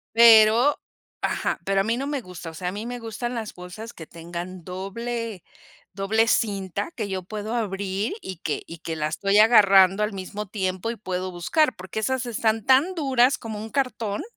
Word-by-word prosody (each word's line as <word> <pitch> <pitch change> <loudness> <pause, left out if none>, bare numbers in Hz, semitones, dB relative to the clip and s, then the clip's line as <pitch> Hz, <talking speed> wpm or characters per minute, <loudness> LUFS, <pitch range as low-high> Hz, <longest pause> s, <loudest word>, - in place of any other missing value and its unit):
Pero, 230 +3 +7 0.5
ajá, - - -1
pero 195 0 +2
a - - 0
mí 230 +3 0
no 275 - -3
me 285 -2 -2
gusta, 180 -4 -9
o - - -16
sea, 180 +3 -5
a - - -1
mí 210 +3 -6
me 245 0 -5
gustan 230 +2 -4
las 225 -2 -5
bolsas 200 +6 -9
que 160 - -10
tengan 175 +1 -7
doble 210 +2 -5 0.5
doble 220 +3 +2
cinta, 200 - 0
que 215 -4 -3
yo 190 -1 -3
puedo 215 +3 -5
abrir 200 - -2
y 185 -3 -7
que 155 - -3
y 165 -1 -10
que 165 -1 -5
la 150 -1 -1
estoy 195 +5 +1
agarrando 200 -3 +6
al 210 - -1
mismo 195 +2 -6
tiempo 185 +1 -2
y - - -6
puedo 185 -2 -3
buscar, 255 - +1
porque 190 +4 -6
esas 260 +2 -1
están 220 -1 0
tan 280 +8 +4
duras 265 -4 +3
como 220 -2 -6
un 220 +1 -7
cartón. 235 -6 -2
210 Hz, 190 wpm, -24 LUFS, 185-230 Hz, 0.5 s, Pero